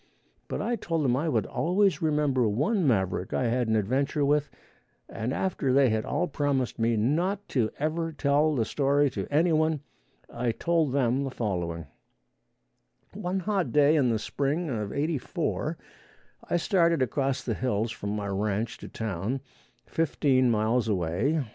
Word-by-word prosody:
But - - -3
I 240 0 -1
told 165 -6 -1
them 125 -2 +3
I 155 +5 0
would - - +1
always 190 +3 +1
remember 150 -7 +2
one 155 - +1
maverick 95 -6 0
I - - +1
had 120 0 0
an 110 - +2
adventure 135 +7 +1
with, 145 0 +2 0.6
and 115 +3 -4
after 150 -4 -1
they 135 -2 +4
had 110 0 0
all 180 - 0
promised 140 -5 -1
me 115 0 +2
not 175 - 0
to 115 -5 +1
ever 165 +2 -1
tell 145 +1 +2
the 115 -4 +1
story 140 +1 +2
to - - -4
any 160 +4 +3
one, 155 -2 +1 0.5
I 120 -2 -2
told 165 -2 +1
them 130 0 +1
the 135 - -2
following: 90 - -3 1.3
One 185 +2 -2
hot 190 - -1
day 150 +2 +5
in 135 -5 +3
the 115 - +1
spring 145 +8 -2
of 105 -4 -3
'84 150 -1 -2 0.7
I - - +2
started 170 -5 +2
across 135 +2 -1
the 115 - -1
hills 115 -1 -1
from 100 - -5
my 105 -1 -3
ranch 100 +2 -2
to - - -8
town, 110 +4 -3 0.4
fifteen 135 -5 +2
miles 115 +2 +1
away. 105 - 0
135 Hz, 160 wpm, -27 LUFS, 115-155 Hz, 1.3 s, day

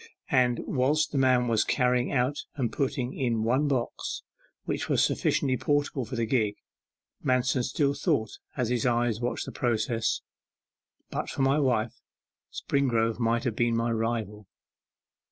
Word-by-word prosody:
And 125 -4 +3
whilst 145 +4 +1
the 140 - 0
man 130 -2 +3
was 115 -2 +3
carrying 125 -1 +1
out 135 +2 0
and 125 -6 -1
putting 130 -2 -1
in 115 -4 0
one 130 +6 +2
box, 130 -4 -2 0.4
which - - -2
was - - +3
sufficiently 130 -2 +1
portable 145 -1 0
for 125 - -6
the 115 -1 0
gig, 110 -4 +1 0.7
Manston 125 0 +2
still 140 +1 +1
thought, 140 - -1 0.2
as 125 -3 0
his 125 0 +1
eyes 120 -2 +1
watched 120 - -2
the - - -6
process 115 -1 0 0.9
'But - - -3
for 135 - -1
my 135 +3 +3
wife, 120 -3 0 0.5
Springrove 115 -5 0
might 115 +2 +1
have 120 -5 -1
been 120 0 +1
my 115 +1 0
rival. 110 -3 -2
125 Hz, 150 wpm, -28 LUFS, 115-135 Hz, 0.9 s, And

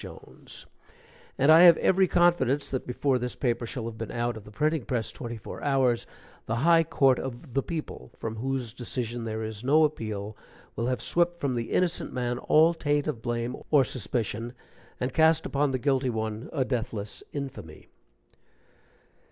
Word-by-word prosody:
Jones, - - -11 0.7
and 140 +4 +5
I 160 +2 +9
have 175 -2 +9
every 190 0 +3
confidence 170 -6 +2
that 130 - -3
before 130 +1 0
this 125 0 -3
paper 120 -3 -1
shall 125 -1 -5
have 115 -2 -7
been 115 -2 -4
out 120 0 -2
of 110 -2 -10
the - - -11
printing 155 +5 0
press 120 -3 -2
twenty 120 -2 -6
four 110 - -9
hours, 130 -4 +1 0.4
the 110 - -1
high 165 -1 +6
court 135 -5 +3
of 130 +1 -7
The 135 - +2
People, 155 - -6
from 110 -1 -5
whose 130 -1 -3
decision 120 -1 -4
there 110 0 -3
is 110 0 -6
no 150 +5 +4
appeal, 110 -8 -2 0.4
will 115 - -1
have 125 0 -1
swept 175 0 +1
from 140 -4 -1
the 115 -1 -3
innocent 180 -1 0
man 125 -1 -2
all 160 +5 +4
taint 145 -3 0
of 140 -7 -3
blame 120 +1 -2
or 145 -3 +5
suspicion, 115 -1 -3 0.5
and 125 +1 -2
cast 160 +1 +4
upon 145 +1 +1
the 130 - 0
guilty 135 0 +1
one 110 0 -3
a 135 -5 0
deathless 110 -5 -4
infamy. 135 - -7
125 Hz, 175 wpm, -27 LUFS, 115-145 Hz, 0.7 s, I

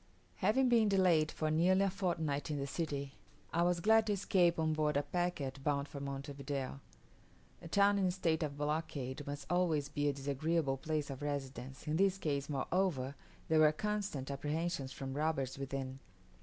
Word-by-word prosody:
HAVING 225 +7 +3
been 230 -3 +4
delayed 180 -6 +4
for 155 -1 -1
nearly 180 +5 +4
a 195 - +3
fortnight 165 -7 -1
in 150 - -1
the 140 - -2
city, 140 -2 -3 0.4
I 170 - +2
was 175 0 +2
glad 220 +3 +5
to 210 - +2
escape 185 -3 +3
on 160 -1 +1
board 150 -1 +1
a 145 - +1
packet 145 -4 -2
bound 140 -1 0
for 140 - -7
Monte 140 0 -5
Video. 140 -1 -4 0.8
A - - -8
town 200 +3 +4
in 190 - +3
a - - +2
state 170 -3 0
of 145 -2 -2
blockade 145 -3 -2
must 145 -1 -5
always 165 -5 +1
be 145 0 0
a - - 0
disagreeable 140 +1 0
place 150 0 -2
of 135 - -7
residence; 135 -2 -4
in 155 +1 +1
this 195 0 +3
case 140 -6 -2
moreover 140 -1 0 0.3
there 160 0 +4
were 155 -1 +7
constant 200 -7 -2
apprehensions 150 0 -2
from 135 0 -5
robbers 140 -3 -1
within. 135 -1 -4
150 Hz, 180 wpm, -35 LUFS, 140-175 Hz, 0.8 s, were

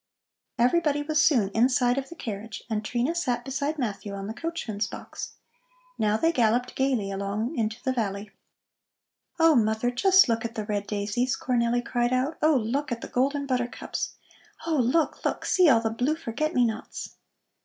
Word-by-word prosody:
Everybody 290 +3 +2
was 310 +1 +2
soon 230 -10 +3
inside 245 +3 +2
of 270 - -7
the 340 - -9
carriage, 220 -6 -6
and 215 -1 -1
Trina 245 +7 0
sat 250 -8 -1
beside 280 +3 -2
Matthew 205 -5 -3
on 195 0 -5
the 215 - -4
coachman's 240 -9 -3
box. - - -8 0.7
Now 215 0 +2
they 330 +7 +2
galloped 245 -2 +1
gaily 255 -7 0
along 200 +8 -2
into 220 -2 -1
the 260 - 0
valley. 205 -4 -3 1.1
"Oh, 325 -1 +6
mother, 220 +1 +2
just 380 +9 +5
look 230 -1 0
at 230 0 -5
the 215 - -3
red 205 -1 -2
daisies!" 210 +5 -1
Cornelli 240 -1 0
cried 240 0 0
out. 265 +5 0
"Oh, 310 0 +4
look 260 +4 -1
at 235 -1 -3
the - - -7
golden 280 +3 0
buttercups! 250 -2 -3 0.5
Oh, 325 -2 +1
look, 265 +6 +1
look; - - -1
see 365 -4 +5
all 230 -4 +5
the 225 -1 -1
blue 250 +7 0
forget 310 0 -3
me 245 - +4
nots!" 220 -1 -5
245 Hz, 175 wpm, -26 LUFS, 220-280 Hz, 1.1 s, Oh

